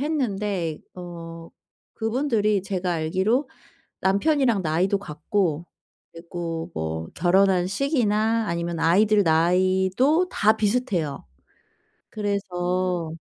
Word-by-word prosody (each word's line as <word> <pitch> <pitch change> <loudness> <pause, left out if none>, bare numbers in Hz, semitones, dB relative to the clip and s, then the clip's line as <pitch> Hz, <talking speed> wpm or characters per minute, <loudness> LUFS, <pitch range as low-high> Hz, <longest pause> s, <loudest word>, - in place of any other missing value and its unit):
했는데 205 - -1 0.2
어 165 -2 -9 0.5
그분들이 220 -4 0
제가 185 -2 -2
알기로 190 - 0 0.5
남편이랑 230 +2 +2
나이도 180 +5 +1
같고 175 -1 -2 0.5
그리고 165 -1 -6
뭐 80 0 -4
결혼한 185 0 +3
시기나 225 -2 +1
아니면 170 -1 -2
아이들 205 +6 +4
나이도 185 - +2
다 215 +1 +3
비슷해요. 205 - -1 0.9
그래서 185 -4 -2
190 Hz, 220 characters per minute, -24 LUFS, 170-215 Hz, 0.9 s, 아이들